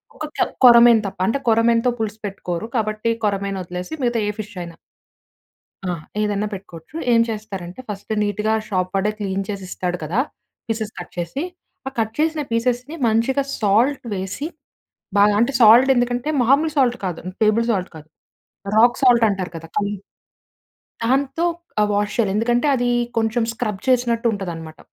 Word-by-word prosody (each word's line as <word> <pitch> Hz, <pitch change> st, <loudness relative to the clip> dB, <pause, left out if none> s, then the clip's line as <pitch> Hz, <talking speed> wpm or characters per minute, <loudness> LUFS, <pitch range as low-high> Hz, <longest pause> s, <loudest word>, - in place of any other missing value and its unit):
ఒక -, -, -7 dB, 0.2 s
కొ -, -, +4 dB, 0.2 s
కొర్రమీను 235 Hz, -2 st, +8 dB
తప్ప. 195 Hz, -1 st, -9 dB
అంటే 275 Hz, +5 st, +1 dB
కొరమేను‌తో 230 Hz, +2 st, +3 dB
పులుసు 215 Hz, 0 st, -3 dB
పెట్టుకోరు. 195 Hz, 0 st, -4 dB
కాబట్టి 215 Hz, +1 st, 0 dB
కొర్రమీను 200 Hz, -1 st, -1 dB
వదిలేసి 180 Hz, -, -7 dB
మిగతా 240 Hz, -1 st, +1 dB
ఏ -, -, 0 dB
ఫిష్షయినా. 180 Hz, -5 st, -8 dB, 1.1 s
ఆ! -, -, 0 dB, 0.3 s
ఏదైనా 210 Hz, 0 st, 0 dB
పెట్టుకోవచ్చు. 185 Hz, -, -11 dB, 0.2 s
ఏం 230 Hz, -, +5 dB
చేస్తారంటే, 200 Hz, -2 st, -6 dB
ఫస్ట్ 205 Hz, +1 st, -5 dB
నీట్‌గా 210 Hz, +1 st, 0 dB, 0.2 s
షాప్ 185 Hz, -2 st, -1 dB
వాడే 195 Hz, +2 st, +1 dB
క్లీన్ 195 Hz, -1 st, -2 dB
చేసిస్తాడు 185 Hz, -2 st, -3 dB
కదా! 170 Hz, +9 st, -2 dB, 0.5 s
పీసెస్ 220 Hz, -1 st, -3 dB
కట్ 175 Hz, -, -8 dB
చేసి. 175 Hz, -, -3 dB, 0.4 s
ఆ -, -, -2 dB
కట్ 220 Hz, -1 st, 0 dB
చేసిన 315 Hz, 0 st, +1 dB
పీసెస్‌ని, 245 Hz, +5 st, -1 dB
మంచిగా 235 Hz, +5 st, +2 dB, 0.2 s
సాల్ట్ 230 Hz, +7 st, +2 dB
వేసి, 190 Hz, +10 st, -4 dB, 0.7 s
బాగా 205 Hz, 0 st, +5 dB
అంటే, 255 Hz, +4 st, +2 dB
సాల్ట్ 235 Hz, +4 st, +8 dB
ఎందుకంటే 245 Hz, +3 st, 0 dB
మామూలు 280 Hz, +6 st, +3 dB
సాల్ట్ 250 Hz, -3 st, +3 dB
కాదు 180 Hz, -3 st, -3 dB, 0.2 s
టేబుల్ 220 Hz, +2 st, +3 dB
సాల్ట్ 190 Hz, -4 st, -1 dB
కాదు. 155 Hz, 0 st, -12 dB, 0.7 s
రాక్ 240 Hz, +2 st, +5 dB
సాల్ట్ 240 Hz, -3 st, +6 dB
అంటారు 190 Hz, -3 st, -3 dB
కదా! 165 Hz, 0 st, -9 dB
కల్లుప్పు. 200 Hz, -1 st, -3 dB, 1.0 s
దాంతో 275 Hz, +6 st, +1 dB, 0.4 s
ఆహ్, 210 Hz, -, +2 dB
వాష్ 205 Hz, 0 st, 0 dB
చేయాలి. 215 Hz, -5 st, +1 dB
ఎందుకంటే 240 Hz, +5 st, +1 dB
అది 245 Hz, -1 st, 0 dB, 0.3 s
కొంచెం 225 Hz, +1 st, +1 dB
స్క్రబ్ 215 Hz, -4 st, -3 dB
చేసినట్టుంటదన్నమాట. 215 Hz, -, 0 dB
220 Hz, 145 wpm, -21 LUFS, 195-240 Hz, 1.1 s, కొర్రమీను